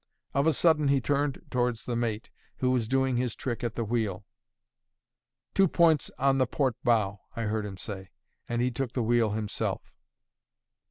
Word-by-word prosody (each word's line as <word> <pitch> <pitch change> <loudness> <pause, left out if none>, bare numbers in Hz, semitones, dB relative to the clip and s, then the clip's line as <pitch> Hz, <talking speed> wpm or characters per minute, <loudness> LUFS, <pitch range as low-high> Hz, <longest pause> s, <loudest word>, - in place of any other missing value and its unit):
Of 140 +3 +2
a 160 - +4
sudden, 155 -1 +3
he 140 0 +4
turned 145 +1 -1
towards 120 -2 0
the 120 - -2
mate, 115 -2 -2 0.3
who 130 0 +1
was 120 -4 +1
doing 130 0 +1
his 125 -2 -1
trick 120 -3 -4
at 115 -1 -2
the 115 - -1
wheel. 105 -4 -2 1.3
"Two 195 -1 +5
points 160 -3 +3
on 135 0 +3
the 130 - +3
port 130 -2 0
bow," 105 -5 +2 0.2
I 115 - -2
heard 105 -1 -1
him 95 -2 -8
say. 95 -1 -6 0.4
And 120 0 0
he 125 - +1
took 125 0 -3
the 125 - 0
wheel 115 -2 +2
himself. 105 -1 -3
120 Hz, 175 wpm, -28 LUFS, 110-135 Hz, 1.3 s, Two